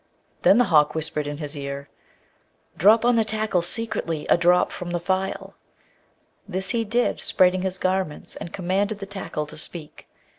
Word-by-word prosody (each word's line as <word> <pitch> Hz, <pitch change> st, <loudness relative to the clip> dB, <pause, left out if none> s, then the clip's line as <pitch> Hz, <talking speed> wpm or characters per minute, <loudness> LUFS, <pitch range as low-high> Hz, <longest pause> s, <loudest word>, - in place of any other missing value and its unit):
Then 200 Hz, -, +6 dB
the 245 Hz, -, +6 dB
hawk 150 Hz, 0 st, +5 dB
whispered 155 Hz, -2 st, -2 dB
in 145 Hz, 0 st, -4 dB
his 150 Hz, 0 st, -4 dB
ear, 140 Hz, 0 st, -6 dB, 0.9 s
'Drop 220 Hz, +6 st, +5 dB
on 245 Hz, -1 st, +4 dB
the 225 Hz, -, +4 dB
tackle 215 Hz, -4 st, 0 dB
secretly 175 Hz, -5 st, -1 dB
a -, -, +8 dB
drop 175 Hz, +1 st, +3 dB
from 180 Hz, -, -6 dB
the 175 Hz, 0 st, -1 dB
phial.' 190 Hz, +2 st, -2 dB, 0.9 s
This 190 Hz, -1 st, -3 dB
he 235 Hz, -1 st, 0 dB
did, 235 Hz, +3 st, 0 dB
spreading 185 Hz, 0 st, +2 dB
his 190 Hz, 0 st, 0 dB
garments, 185 Hz, -4 st, -2 dB
and 170 Hz, -, -7 dB
commanded 195 Hz, +3 st, -1 dB
the 200 Hz, -, -7 dB
tackle 195 Hz, -6 st, -4 dB
to 150 Hz, -, -12 dB
speak. 155 Hz, -1 st, -8 dB
185 Hz, 170 wpm, -24 LUFS, 160-205 Hz, 0.9 s, a